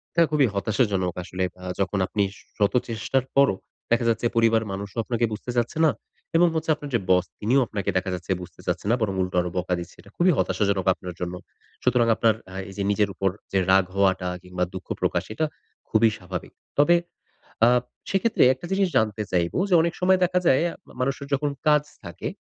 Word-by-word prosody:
এটা 170 - +6
খুবই 145 -4 +4
হতাশাজনক 100 -3 0
আসলে। 95 +1 -3 0.2
আ - - -11 0.2
যখন 100 0 0
আপনি 100 -1 0 0.3
শত 100 -1 +2
চেষ্টার 120 +3 -1
পরও 140 -8 +5 0.4
দেখা 120 0 +3
যাচ্ছে 115 +1 0
পরিবারের 115 -1 +3
মানুষও 100 +2 -6
আপনাকে 120 0 0
বুঝতে 110 +3 -5
চাচ্ছে 120 +4 0
না, 155 - +5 0.4
এবং 175 +1 +6
হচ্ছে 160 0 -2
আপনার 145 -1 -8
যে, 115 - +3
বস, 90 -1 +4
তিনিও 125 +6 +3
আপনাকে 100 -2 -3
দেখা 95 +1 -1
যাচ্ছে 90 +2 -6
বুঝতে 90 - -11
চাচ্ছে - - -2
না - - +5
বরং 105 -3 0
উল্টো 90 0 -2
আরও 90 - -3
বকা 90 0 -1
দিচ্ছে। 85 - -9
এটা - - -18
খুবই 180 +1 +4
হতাশাজনক 100 -3 +1
আপনার 90 -1 -8
জন্য। 90 0 -3 0.5
সুতরাং 120 -2 +3
আপনার 110 -1 +3 0.2
আ 95 - -9
এই 95 - -10
যে, 100 - -1
নিজের 105 -1 +2
ওপর 95 +1 0 0.2
যে, 95 - +2
রাগ 95 -1 +5
হওয়াটা 95 -2 +2 0.2
কিংবা 90 0 -3
দুঃখ 95 - -8
প্রকাশ, - - +1
এটা 155 - 0 0.4
খুবই 110 0 +4
স্বাভাবিক। 90 -1 -7 0.3
তবে 170 +4 +6 0.7
আ - - +6 0.4
সে 195 - +2
ক্ষেত্রে 230 -1 +3
একটা 130 - -10
জিনিস 195 0 +2
জানতে 110 -1 +1
চাইব 85 -2 +1 0.2
যে, 185 - +2
অনেক 170 +1 0
সময় 185 +1 +5
দেখা 180 0 +2
যায় 130 - +5 0.4
মানুষের 135 +2 -2
যখন 145 +1 +1 0.2
কাজ 150 -1 +5 0.2
থাকে, 85 -2 -6
110 Hz, 195 wpm, -24 LUFS, 95-135 Hz, 0.7 s, এটা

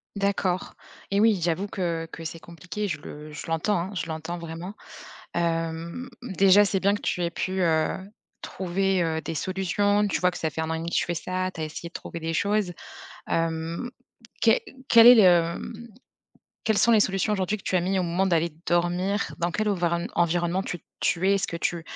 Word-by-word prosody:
D'accord. 200 -2 -1 0.4
Eh 200 - +2
oui! 215 -3 +4
J'avoue 175 +4 0
que 170 -4 -2
que 165 - -8
c'est 165 +1 -5
compliqué 180 +5 -6
je 155 -4 -3
le 150 +1 -9
je 155 - -7
l'entends, 165 +5 +1
hein. 185 +4 -4
Je 180 -3 -3
l'entends 160 +2 -5
vraiment. 170 +4 -7 0.6
Hem, 165 +6 -2
déjà 195 -2 +5
c'est 195 - 0
bien 200 +1 +3
que - - -4
tu 180 - -1
aies 170 - 0
pu, 190 +2 -2
heu, 160 -2 +3 0.5
trouver, 190 0 0
heu, 160 -1 -1
des 165 - -4
solutions, 205 +4 +1
tu - - -1
vois 180 0 +4
que 175 - -9
ça 160 - -1
fait 160 - -4
1 160 - -2
an 160 - -1
et - - -2
demi 165 +1 -4
que - - 0
tu - - +1
fais 175 - -1
ça, 185 +2 -2
tu 160 - -5
as - - 0
essayé 155 +2 -6
de - - -26
trouver 170 - -7
des 165 0 -3
choses. 200 0 +1 0.6
Hem, 165 +6 -1 0.5
que - - +6 0.4
quel 230 0 +9
est 245 - +11
le, 220 - +7
hem 180 +6 +2 0.8
quelles 220 -2 +2
sont 235 - +5
les 220 - +6
solutions 195 +1 +1
aujourd'hui 195 +1 0
que 195 - -16
tu - - -2
as 180 - +4
mis 190 +2 0
au 180 - +1
moment 175 +3 +1
d'aller 170 -3 +1
dormir? 175 +4 0
Dans 170 +1 0
quel 215 +4 -1
ovironne 170 -3 0
environnement 175 +2 +1
tu 175 - -5 0.2
tu 180 +2 +1
es? 200 - +5
Est-ce 195 - 0
que 170 - -3
tu 170 0 -2
175 Hz, 215 wpm, -26 LUFS, 165-195 Hz, 0.8 s, est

